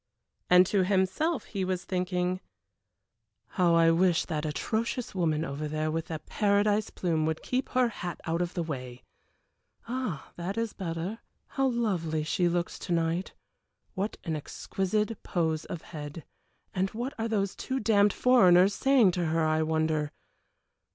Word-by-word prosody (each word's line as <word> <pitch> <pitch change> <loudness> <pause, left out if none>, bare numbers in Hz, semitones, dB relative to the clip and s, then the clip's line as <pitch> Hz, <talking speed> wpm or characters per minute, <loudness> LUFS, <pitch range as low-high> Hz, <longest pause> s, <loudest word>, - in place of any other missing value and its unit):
And 180 +1 +7
to 190 0 +2
himself 195 - +1
he 195 -3 -3
was 185 -1 -2
thinking 180 0 -1 1.1
"How 175 -3 +3
I 165 0 +5
wish 170 0 +3
that 155 -1 -2
atrocious 225 +10 -2
woman 165 -4 0
over 150 0 -4
there 155 +1 -1
with 165 +1 -2
the 160 - -3
paradise 205 +5 +1
plume 160 -3 0
would 160 0 -2
keep 255 +1 -1
her 255 -2 +2
hat 180 -6 -6
out 165 +1 0
of 175 0 -3
the 175 - 0
way. 130 -5 -6 0.8
Ah, 235 - -4
that 180 +5 -4
is 230 -1 -1
better! 180 +3 -4 0.3
How 270 -1 +1
lovely 185 -11 0
she 175 +3 +1
looks 175 0 -2
to - - -6
night! 165 +2 0 0.6
What 200 +3 -3
an 165 -3 -2
exquisite 205 +8 -2
pose 160 -3 -1
of 175 -5 -6
head! 150 0 -8 0.5
And 190 -1 0
what 245 +5 -3
are 225 - 0
those 200 -3 -1
two 265 0 -3
damned 205 -2 +4
foreigners 190 -7 +5
saying 260 -5 +4
to 175 -1 -1
her, 160 0 +1
I 155 0 +2
wonder. 155 -1 0
180 Hz, 155 wpm, -29 LUFS, 160-205 Hz, 1.1 s, And